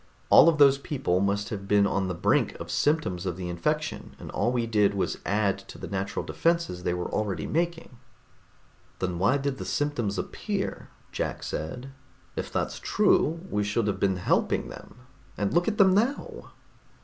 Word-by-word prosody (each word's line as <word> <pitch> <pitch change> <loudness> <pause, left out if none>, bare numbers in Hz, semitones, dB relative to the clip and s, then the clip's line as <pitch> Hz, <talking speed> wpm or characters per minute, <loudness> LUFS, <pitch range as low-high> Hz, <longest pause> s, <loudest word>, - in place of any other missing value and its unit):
All - - +9
of 160 - +1
those 140 -1 +6
people 135 - -1
must 100 +2 0
have 100 -4 -5
been 100 0 +4
on 100 -1 0
the 90 - -3
brink - - +1
of - - -6
symptoms 145 - 0
of 90 -1 -3
the 90 -1 -4
infection, 150 - -2
and - - -9
all 120 - 0
we 120 -2 0
did 105 -3 +2
was 100 - -1
add 100 -1 +1
to - - -9
the - - -7
natural 95 -1 -3
defenses 170 - 0
they 90 - -1
were 90 - -3
already 100 -6 -2
making." 165 -6 -2 1.0
"Then 90 -2 -2
why 100 +9 +3
did 140 -1 -3
the - - -4
symptoms 125 -9 -1
appear?" - - -4 0.2
Jack - - -3
said. 125 - -5 0.4
"If - - -4
that's - - -2
true, 165 +2 +2
we 105 0 -1
should 105 +2 0
have 100 -2 -1
been 95 -2 +1
helping 90 - +1
them, - - -11 0.4
and 100 -1 -1
look 175 +2 +2
at 215 -1 0
them 190 -2 +6
now!" 280 - -1
105 Hz, 180 wpm, -27 LUFS, 95-150 Hz, 1.0 s, All